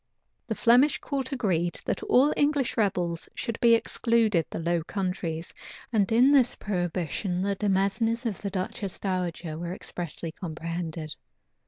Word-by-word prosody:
The 220 - -2
Flemish 250 +7 +5
court 275 -2 -3
agreed, 175 -10 0
that - - -1
all 275 +4 +4
English 285 -3 +1
rebels 180 -6 0
should 230 - -3
be 235 -1 +6
excluded 225 -6 +1
the - - -5
Low 170 0 0
Countries; 175 -3 -3 0.4
and 205 -3 +2
in 245 +5 +6
this 265 -4 +4
prohibition 180 -1 -2
the 200 0 0
demesnes 210 +4 +1
of 215 -6 -2
the 200 - -2
duchess 190 0 -4
dowager 175 -4 -3
were 170 +1 -4
expressly 170 -2 -5
comprehended. 165 -2 -5
195 Hz, 140 wpm, -27 LUFS, 170-230 Hz, 0.4 s, be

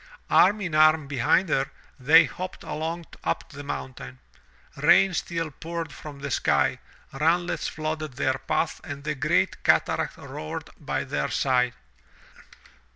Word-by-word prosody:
Arm 205 +3 +5
in 175 -5 -3
arm 155 0 +5
behind 140 +7 +2
her, 135 -1 +1 0.3
they 155 +6 +7
hopped 185 +3 -7
along 165 +2 -4 0.2
up - - -2
the 145 0 -8
mountain. 65 - -6 0.6
Rain 195 -1 +5
still 165 -1 -2
poured 165 +3 -6
from 150 -2 -9
the 140 -1 -4
sky, - - +2 0.3
runlets 165 +5 +1
flooded 155 -2 -4
their 130 +1 0
path 165 - -1
and 140 -2 -7
the 150 +1 -1
great 135 - 0
cataract - - +2
roared 75 - -7
by - - -2
their - - -2
side. 125 -2 +1
155 Hz, 135 wpm, -26 LUFS, 135-165 Hz, 0.6 s, they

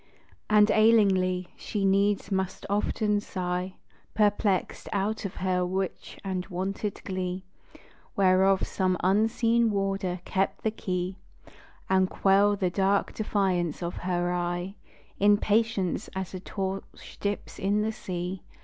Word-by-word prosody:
And 210 0 +6
ailingly, 190 -5 +3
she 205 -2 -3
needs 200 +1 +2
must 190 -1 -2
often 210 0 +1
sigh, 185 -1 -3 0.4
Perplexèd 205 -2 +1
out 205 +2 -1
of 195 - -5
her 185 -1 0
rich 185 +1 -3 0.3
wonted 195 +3 -3
glee, 185 -1 -3 0.7
Whereof 190 0 +4
some 185 -1 0
unseen 225 +4 +3
warder 195 -3 -1
kept 195 0 -1
the 220 - +1
key, 185 -3 -3 0.7
And 190 -1 +3
quell 200 +1 +3
the 185 -3 0
dark 195 +1 +1
defiance 185 -6 0
of 170 - -4
her 175 -1 -1
eye 175 +1 -2 0.5
In 205 +1 +5
patience, 215 -3 0
as 190 -1 -4
a 185 - -4
torch 190 +1 -6
dips 205 0 -3
in 205 +2 +1
the 220 - 0
sea. 180 -2 -5
195 Hz, 120 wpm, -27 LUFS, 185-205 Hz, 0.7 s, And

